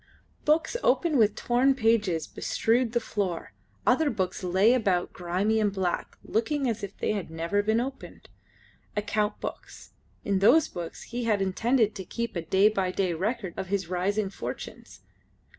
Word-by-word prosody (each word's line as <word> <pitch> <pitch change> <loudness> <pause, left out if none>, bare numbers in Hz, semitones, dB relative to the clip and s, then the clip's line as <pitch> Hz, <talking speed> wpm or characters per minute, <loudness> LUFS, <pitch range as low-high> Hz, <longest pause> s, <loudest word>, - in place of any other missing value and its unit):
Books 320 +6 +2
open 350 -11 +2
with 215 -1 +4
torn 255 +4 +2
pages 215 - +2
bestrewed 235 +1 0
the 240 - +3
floor; 195 -7 -3 0.3
other 320 -2 +3
books 190 -6 -2
lay 190 +6 +4
about 195 -8 +1
grimy 185 +5 0
and 210 -2 +2
black, 190 -3 -2
looking 270 +5 0
as 230 -2 -1
if 200 -1 -6
they - - 0
had 200 -6 -4
never 165 +5 0
been 220 +2 +1
opened. 265 +2 -6 0.7
Account 210 0 0
books. - - -8 0.3
In 200 -1 +1
those 295 +11 +5
books 170 -2 -7
he 240 0 -4
had 215 -3 +2
intended 220 +4 +1
to 190 - -6
keep 235 +5 -4 0.2
day 195 +2 +5
by 195 -4 0
day 185 0 0
a - - -2
record 200 +1 -2
of 190 - -3
his 190 -3 -2
rising 195 +3 0
fortunes. - - -8
210 Hz, 160 wpm, -27 LUFS, 190-235 Hz, 0.7 s, those